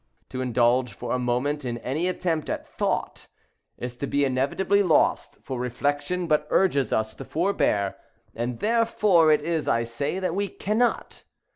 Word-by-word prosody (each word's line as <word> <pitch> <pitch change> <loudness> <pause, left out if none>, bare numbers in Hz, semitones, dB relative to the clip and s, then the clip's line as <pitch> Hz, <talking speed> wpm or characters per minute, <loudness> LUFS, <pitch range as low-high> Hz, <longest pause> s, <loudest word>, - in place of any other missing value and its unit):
To 130 - -4
indulge, 125 -1 +2
for 120 +4 -6
a 125 - +1
moment, 125 +4 -1
in 120 -2 -3
any 145 +9 -2
attempt 170 -4 -1
at - - -3
thought, - - -3 0.5
is 125 0 -5
to 140 - -3
be 140 +1 +1
inevitably 140 +10 +1
lost; 175 -6 +2
for 130 -2 -4
reflection 145 +8 -1
but 150 -2 +1
urges 140 - +2
us 110 0 0
to - - -9
forbear, 155 - 0 0.4
and 120 +1 -3
therefore 210 -7 +3
it 150 -1 +3
is, 165 -1 -1
I 115 - +2
say, 140 +8 -3
that 185 -3 -1
we 200 +2 0
cannot. 220 +5 -1
145 Hz, 160 wpm, -25 LUFS, 125-180 Hz, 0.5 s, therefore